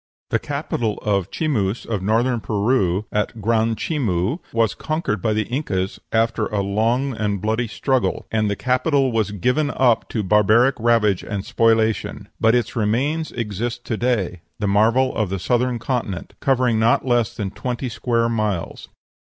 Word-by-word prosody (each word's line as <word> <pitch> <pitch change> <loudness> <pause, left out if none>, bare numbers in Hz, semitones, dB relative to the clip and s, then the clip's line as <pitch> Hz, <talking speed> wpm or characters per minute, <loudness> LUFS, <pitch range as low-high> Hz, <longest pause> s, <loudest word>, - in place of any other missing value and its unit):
The - - +2
capital 110 -3 -2
of 100 -3 +1
the - - -28
Chimus 115 -9 -1
of 110 -4 -2
Northern 115 +5 +1
Peru 105 -3 +1
at 105 +2 -1
Gran 115 +1 +1
Chimu 115 - -1
was 115 -3 +1
conquered 155 - -2
by 110 - +1
the 110 0 +1
Incas 100 -8 -2
after 115 -1 +1
a 100 -2 -1
long 115 +7 0
and 105 -2 -1
bloody 110 +4 -1
struggle, 130 +4 -1
and 110 -1 +1
the 100 - -1
capital 130 - +1
was 110 -2 0
given 125 - 0
up 125 -5 +2
to 110 - -2
barbaric 105 +6 +4
ravage 110 -4 +3
and 100 -2 -5
spoliation. 110 -2 +1
But 115 +2 +4
its 120 - -1
remains 130 +9 0
exist 120 +2 -4
to 110 - -2
day, 105 -8 -1 0.2
the 105 - -1
marvel 115 +6 +3
of 110 -4 0
the 95 - -2
Southern 125 +5 0
Continent, 115 -6 -3
covering 125 -5 +2
not 115 +3 +3
less 120 -3 +1
than 100 -3 -3
twenty 125 +4 -4
square 115 0 0
miles. 105 -6 -2
115 Hz, 160 wpm, -21 LUFS, 105-125 Hz, 0.2 s, barbaric